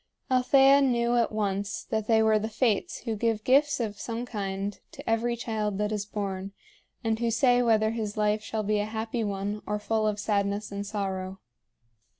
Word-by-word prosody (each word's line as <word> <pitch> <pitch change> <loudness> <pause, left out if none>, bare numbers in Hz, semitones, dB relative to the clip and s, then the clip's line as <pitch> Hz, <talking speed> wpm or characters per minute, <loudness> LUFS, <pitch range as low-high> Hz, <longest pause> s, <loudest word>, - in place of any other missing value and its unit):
Althea 270 +2 +5
knew 240 -3 +2
at 235 -1 +2
once 200 -2 -2
that 220 -1 -2
they 220 -1 +4
were 220 -1 +4
the 215 +1 -3
Fates 230 - 0
who 225 -3 -3
give 220 0 0
gifts 285 +4 +3
of 210 -3 -3
some 235 +1 -4
kind 200 -3 -4
to 285 -2 -11
every 230 +1 +1
child 215 -4 -2
that 210 +1 -1
is 205 -1 -2
born, 195 -2 -4 0.5
and 225 -1 0
who 235 -1 +1
say 245 +2 +3
whether 220 -2 +3
his 220 -2 -4
life 210 0 +1
shall 215 0 -3
be 210 0 +1
a 205 - 0
happy 220 +2 -3
one 205 +1 -3
or 210 - 0
full 215 +1 0
of 210 -1 -1
sadness 205 0 -1
and 200 0 -4
sorrow. 190 -2 -3
215 Hz, 185 wpm, -27 LUFS, 205-235 Hz, 0.5 s, Althea